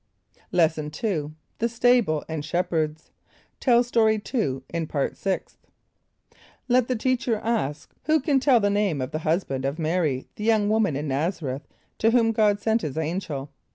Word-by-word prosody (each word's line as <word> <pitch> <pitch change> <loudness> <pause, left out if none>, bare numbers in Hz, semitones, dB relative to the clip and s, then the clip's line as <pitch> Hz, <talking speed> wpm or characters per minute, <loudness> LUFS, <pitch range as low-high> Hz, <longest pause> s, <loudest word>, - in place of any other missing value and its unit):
= - - -33
Lesson 155 -2 +1
II. 155 -9 -1 0.3
The 235 - +1
Stable 235 -9 +2
and 160 -2 -4
Shepherds. 160 -2 -2 0.5
(Tell 240 -2 +4
Story 225 -3 +3
2 175 - -2
in 165 -1 -3
Part 140 -2 -1
Sixth.) 195 -2 -3 1.1
Let 250 -1 +3
the 255 - 0
teacher 245 0 0
ask, 215 -11 -2
"Who 310 +2 +3
can 275 -1 +2
tell 260 -2 +4
the 205 -1 +1
name 200 -7 +1
of 130 +2 -3
the 155 - -2
husband 155 -5 -1
of 140 +4 -2
M[=a]´r[)y], 155 -5 0
the 210 - -5
young 215 -2 +3
woman 215 -8 +2
in 150 +2 -3
N[)a]z´a 160 +6 -1
r[)e]th 135 0 -3 0.4
to 225 - +4
whom 230 -1 +3
God 210 -2 +2
sent 225 +2 +1
his 150 -4 -4
angel?" 160 -4 -3
190 Hz, 170 wpm, -25 LUFS, 155-225 Hz, 1.1 s, Tell